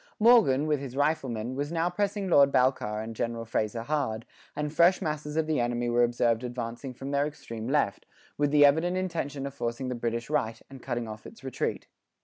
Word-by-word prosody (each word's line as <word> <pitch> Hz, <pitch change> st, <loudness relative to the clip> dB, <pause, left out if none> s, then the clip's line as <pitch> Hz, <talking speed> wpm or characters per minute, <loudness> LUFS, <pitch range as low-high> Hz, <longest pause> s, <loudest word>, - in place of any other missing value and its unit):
Morgan, 215 Hz, -, +5 dB
with 150 Hz, -2 st, +1 dB
his 135 Hz, -2 st, -7 dB
riflemen, 130 Hz, -6 st, 0 dB
was 145 Hz, +3 st, -3 dB
now 170 Hz, 0 st, +1 dB
pressing 200 Hz, +2 st, -1 dB
Lord 140 Hz, -5 st, +5 dB
Balcarres 120 Hz, -5 st, +1 dB
and 115 Hz, 0 st, -7 dB
General 115 Hz, 0 st, -3 dB
Fraser 110 Hz, 0 st, -2 dB
hard, 125 Hz, -6 st, -2 dB, 0.3 s
and 150 Hz, 0 st, -3 dB
fresh 175 Hz, +3 st, +5 dB
masses 150 Hz, -1 st, -3 dB
of 160 Hz, -, +2 dB
the 155 Hz, -3 st, 0 dB
enemy 120 Hz, 0 st, 0 dB
were 120 Hz, 0 st, +4 dB
observed 120 Hz, -1 st, +1 dB
advancing 120 Hz, +1 st, -5 dB
from 135 Hz, +2 st, -7 dB
their 140 Hz, +1 st, +2 dB
extreme 115 Hz, -6 st, -7 dB
left, 135 Hz, -7 st, 0 dB, 0.3 s
with 145 Hz, -1 st, +1 dB
the 145 Hz, 0 st, +6 dB
evident 160 Hz, +6 st, +3 dB
intention 160 Hz, -7 st, -3 dB
of 140 Hz, -, -5 dB
forcing 125 Hz, 0 st, -3 dB
the -, -, -1 dB
British 115 Hz, -1 st, -3 dB
right, 115 Hz, -7 st, -1 dB
and 135 Hz, -2 st, -10 dB
cutting 120 Hz, -1 st, -3 dB
off 110 Hz, 0 st, -8 dB
its 125 Hz, -, -14 dB
retreat. 130 Hz, -2 st, -3 dB
135 Hz, 195 wpm, -28 LUFS, 120-150 Hz, 0.3 s, the